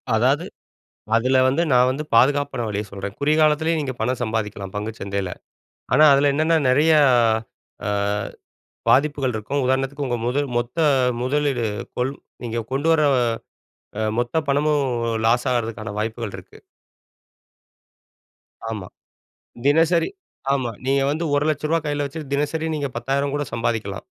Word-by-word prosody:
அதாவது, -, -, +2 dB, 0.7 s
அதுல 130 Hz, +3 st, +3 dB
வந்து 140 Hz, +6 st, +1 dB
நான் 125 Hz, 0 st, +5 dB
வந்து 140 Hz, +4 st, -3 dB
பாதுகாப்பான 130 Hz, +1 st, +3 dB
வழிய 105 Hz, 0 st, -2 dB
சொல்றேன். 100 Hz, 0 st, -6 dB
குறுகிய 150 Hz, +2 st, +2 dB
காலத்துலயும் 155 Hz, +1 st, +2 dB
நீங்க 135 Hz, -3 st, -3 dB
பணம் 125 Hz, +3 st, -1 dB
சம்பாதிக்கலாம் 105 Hz, -4 st, -3 dB
பங்குச்சந்தைல. 100 Hz, -3 st, -4 dB, 0.6 s
ஆனா, 155 Hz, -, +6 dB
அதுல 140 Hz, +1 st, +3 dB
என்னென்ன 160 Hz, +2 st, +3 dB
நெறையா 150 Hz, +4 st, +4 dB, 0.9 s
அ -, -, -1 dB, 1.0 s
பாதிப்புகள் 140 Hz, -2 st, +3 dB
இருக்கும், 130 Hz, +6 st, -2 dB
உதாரணத்துக்கு 135 Hz, +2 st, 0 dB
உங்க 120 Hz, -1 st, -1 dB
முதல் 140 Hz, +3 st, 0 dB
மொத்த 120 Hz, +7 st, -4 dB, 0.4 s
முதலீடு 140 Hz, -2 st, 0 dB, 0.3 s
கொல் 130 Hz, +2 st, 0 dB, 0.3 s
நீங்க 115 Hz, -1 st, -2 dB
கொண்டு 145 Hz, +4 st, 0 dB
வர 160 Hz, -, +3 dB, 1.0 s
அ -, -, 0 dB, 0.2 s
மொத்த 120 Hz, +5 st, -1 dB
பணமும் 145 Hz, 0 st, +2 dB, 0.4 s
லாஸ் 120 Hz, +3 st, +2 dB
ஆகுறதுக்கான 115 Hz, -3 st, -2 dB
வாய்ப்புகள் 110 Hz, -1 st, -3 dB
இருக்கு. 90 Hz, -, -14 dB, 2.1 s
ஆமா. 105 Hz, -5 st, -5 dB, 0.8 s
தினசரி 165 Hz, -, +3 dB, 0.4 s
ஆமா. 130 Hz, -4 st, -1 dB
நீங்க 135 Hz, +1 st, +2 dB
வந்து 160 Hz, +3 st, -2 dB
ஒரு 145 Hz, -, +2 dB
லட்சம் 150 Hz, 0 st, -2 dB
ரூபா 165 Hz, -, +3 dB
கைல 145 Hz, -1 st, -1 dB
வச்சுட்டு 140 Hz, 0 st, -7 dB
தினசரி 150 Hz, +3 st, -1 dB
நீங்க 145 Hz, -2 st, -2 dB
10,000 140 Hz, +3 st, -1 dB
கூட 145 Hz, -, -1 dB
சம்பாதிக்லாம். 115 Hz, -4 st, -2 dB
135 Hz, 130 wpm, -22 LUFS, 115-145 Hz, 2.1 s, ஆனா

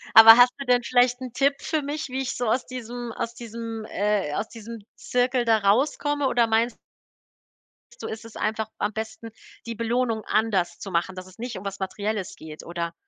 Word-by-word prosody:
Aber 225 Hz, 0 st, +12 dB
hast 245 Hz, 0 st, +7 dB
du 275 Hz, -, -5 dB
denn 245 Hz, -1 st, +4 dB
vielleicht 245 Hz, +1 st, +3 dB
'n 255 Hz, -2 st, -6 dB
Tipp 275 Hz, +3 st, +2 dB
für 315 Hz, -2 st, -1 dB
mich, 295 Hz, +2 st, -4 dB
wie 260 Hz, +1 st, -3 dB
ich 260 Hz, -, -3 dB
so 245 Hz, -, -1 dB
aus 245 Hz, +4 st, +1 dB
diesem 240 Hz, -1 st, -6 dB
aus 230 Hz, +1 st, -4 dB
diesem, 230 Hz, -2 st, -6 dB
äh 200 Hz, -8 st, 0 dB
aus 215 Hz, +2 st, -2 dB
diesem 230 Hz, -2 st, -9 dB
Zirkel 250 Hz, 0 st, 0 dB
da 225 Hz, -2 st, +4 dB
rauskomme? 280 Hz, +7 st, +1 dB
Oder 235 Hz, -2 st, +3 dB
meinst 225 Hz, +1 st, +1 dB, 1.2 s
du -, -, -5 dB
ist 220 Hz, +1 st, -6 dB
es 225 Hz, -, -12 dB
einfach 220 Hz, 0 st, -2 dB
am 205 Hz, -, -1 dB
besten, 220 Hz, +1 st, -6 dB, 0.4 s
die 230 Hz, -, -4 dB
Belohnung 230 Hz, 0 st, 0 dB
anders 215 Hz, -5 st, 0 dB
zu 195 Hz, -, -7 dB
machen, 175 Hz, +2 st, -1 dB
dass 185 Hz, 0 st, -7 dB
es 185 Hz, +2 st, -17 dB
nicht 240 Hz, 0 st, -5 dB
um 190 Hz, -, -10 dB
was 200 Hz, 0 st, -5 dB
Materielles 200 Hz, +1 st, -3 dB
geht, 155 Hz, -1 st, -10 dB
oder? 170 Hz, 0 st, -4 dB
230 Hz, 195 wpm, -25 LUFS, 210-245 Hz, 1.2 s, Aber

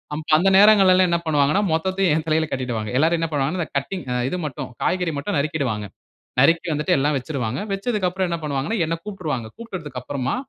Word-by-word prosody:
அம் 155 Hz, -, -5 dB
அந்த 185 Hz, +4 st, +3 dB
நேரங்கள்லல்லாம் 190 Hz, -3 st, +6 dB
என்ன 170 Hz, -, +2 dB
பண்ணுவாங்கன்னா, 150 Hz, +4 st, +2 dB
மொத்தத்தையும் 185 Hz, +1 st, +1 dB
என் 160 Hz, 0 st, -2 dB
தலையில 160 Hz, 0 st, +1 dB
கட்டிடுவாங்க. 120 Hz, -5 st, -3 dB
எல்லாரும் 165 Hz, +3 st, +2 dB
என்ன 165 Hz, -, 0 dB
பண்ணுவாங்கனா, 145 Hz, +5 st, -1 dB
இந்த 165 Hz, -, -3 dB
கட்டிங் 170 Hz, +6 st, -4 dB, 0.2 s
இது 180 Hz, -, -3 dB
மட்டும், 140 Hz, -4 st, -5 dB
காய்கறி 180 Hz, -3 st, 0 dB
மட்டும் 165 Hz, +5 st, -2 dB
நறுக்கிடுவாங்க. 140 Hz, -8 st, -2 dB, 0.6 s
நறுக்கி 165 Hz, +5 st, +3 dB
வந்துட்டு 150 Hz, 0 st, +1 dB
எல்லாம் 145 Hz, +2 st, +1 dB
வச்சிடுவாங்க. 130 Hz, -3 st, -3 dB
வச்சதுக்கு 200 Hz, -2 st, -1 dB
அப்புறம் 185 Hz, 0 st, -2 dB
என்ன 170 Hz, -1 st, -2 dB
பண்ணுவாங்கன்னா, 145 Hz, +8 st, -2 dB
என்ன 165 Hz, +1 st, -1 dB
கூப்பிட்ருவாங்க. 160 Hz, -, -4 dB
கூப்பிட்டதுக்கு 165 Hz, -, -7 dB
அப்புறமா 130 Hz, -, -2 dB
160 Hz, 175 wpm, -22 LUFS, 140-185 Hz, 0.6 s, நேரங்கள்லல்லாம்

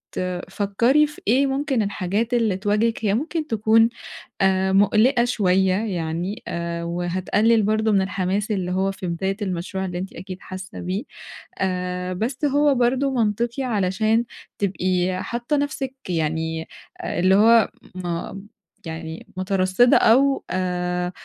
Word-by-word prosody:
بتفكّري 200 Hz, +10 st, +1 dB
في 300 Hz, -, -13 dB
إيه 270 Hz, +5 st, +4 dB
ممكن 270 Hz, -3 st, 0 dB
الحاجات 205 Hz, +4 st, -1 dB
اللي 220 Hz, -6 st, +2 dB
تواجهِك 215 Hz, +2 st, 0 dB
هي 200 Hz, -, +2 dB
ممكن 310 Hz, +5 st, -2 dB
تكون 225 Hz, +1 st, +4 dB, 0.5 s
آآ 190 Hz, 0 st, +2 dB
مُقلِقة 225 Hz, +5 st, +4 dB
شوية 190 Hz, -5 st, +2 dB
يعني 180 Hz, -2 st, -3 dB
آآ 170 Hz, 0 st, -3 dB
وهتقلِّل 185 Hz, +6 st, +1 dB
برضه 215 Hz, +1 st, +1 dB
من 195 Hz, -2 st, +3 dB
الحماس 195 Hz, +3 st, -1 dB
اللي 185 Hz, -3 st, -1 dB
هو 190 Hz, +1 st, +1 dB
في 190 Hz, -2 st, -6 dB
بداية 190 Hz, +3 st, -2 dB
المشروع 190 Hz, 0 st, -3 dB
اللي 175 Hz, -1 st, -4 dB
أنتِ 190 Hz, +2 st, -5 dB
أكيد 185 Hz, +1 st, -8 dB
حاسّة 185 Hz, 0 st, -8 dB
بيه، 190 Hz, +7 st, -3 dB, 0.6 s
آآ 180 Hz, -1 st, -2 dB
بس 245 Hz, +9 st, -2 dB
هو 290 Hz, 0 st, +3 dB
برضه 255 Hz, +3 st, +2 dB
منطقي 235 Hz, +3 st, 0 dB
علشان 220 Hz, +1 st, +1 dB, 0.3 s
تبقي 185 Hz, -1 st, 0 dB
حاطّة 240 Hz, +5 st, -2 dB
نَفْسِك 270 Hz, -2 st, -2 dB
يعني 160 Hz, 0 st, -2 dB, 0.4 s
اللي 185 Hz, +2 st, +2 dB
هو 225 Hz, +1 st, +5 dB, 0.3 s
م 175 Hz, -1 st, -4 dB, 0.5 s
يعني 160 Hz, 0 st, -7 dB
مُترصِّدة 185 Hz, +5 st, +3 dB
أو 270 Hz, +4 st, +4 dB
آآ 180 Hz, -1 st, -1 dB
195 Hz, 130 wpm, -22 LUFS, 180-230 Hz, 0.6 s, هو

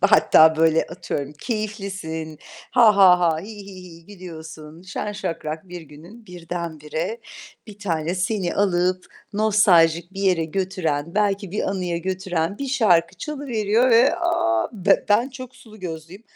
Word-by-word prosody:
hatta 160 Hz, 0 st, +5 dB
böyle 160 Hz, 0 st, +3 dB
atıyorum 145 Hz, -4 st, -5 dB
keyiflisin. 195 Hz, -, -5 dB, 0.3 s
Ha 225 Hz, -5 st, +5 dB
ha 180 Hz, -2 st, +7 dB
ha, 165 Hz, -2 st, +2 dB
hi 195 Hz, -, -10 dB, 0.2 s
hi 190 Hz, -2 st, -11 dB
hi 165 Hz, -2 st, -14 dB
gülüyorsun. 160 Hz, -4 st, -11 dB
Şen 195 Hz, +3 st, -5 dB
şakrak 165 Hz, -3 st, -5 dB
bir 175 Hz, -1 st, -8 dB
günün 170 Hz, +10 st, -15 dB
birdenbire 170 Hz, +1 st, -5 dB, 0.5 s
bir 210 Hz, -2 st, -12 dB
tane 170 Hz, -4 st, -2 dB
seni 185 Hz, -1 st, -1 dB
alıp 185 Hz, -2 st, +1 dB, 0.3 s
nostaljik 190 Hz, -5 st, +3 dB
bir 195 Hz, -, -7 dB
yere 180 Hz, -4 st, +2 dB
götüren, 165 Hz, -3 st, -3 dB
belki 200 Hz, -2 st, 0 dB
bir 210 Hz, -, -2 dB
anıya 180 Hz, -3 st, -2 dB
götüren 185 Hz, 0 st, -3 dB
bir 275 Hz, -, -4 dB
şarkı 185 Hz, -9 st, +2 dB
çalıveriyor 245 Hz, -, 0 dB
ve, 250 Hz, +8 st, +5 dB
a! 345 Hz, -, 0 dB, 0.2 s
B 195 Hz, -2 st, +2 dB
ben 230 Hz, +6 st, +3 dB
çok 255 Hz, -1 st, -10 dB
sulu 215 Hz, -4 st, -16 dB
gözlüyüm. 170 Hz, +3 st, -8 dB
185 Hz, 140 wpm, -22 LUFS, 165-210 Hz, 0.5 s, ha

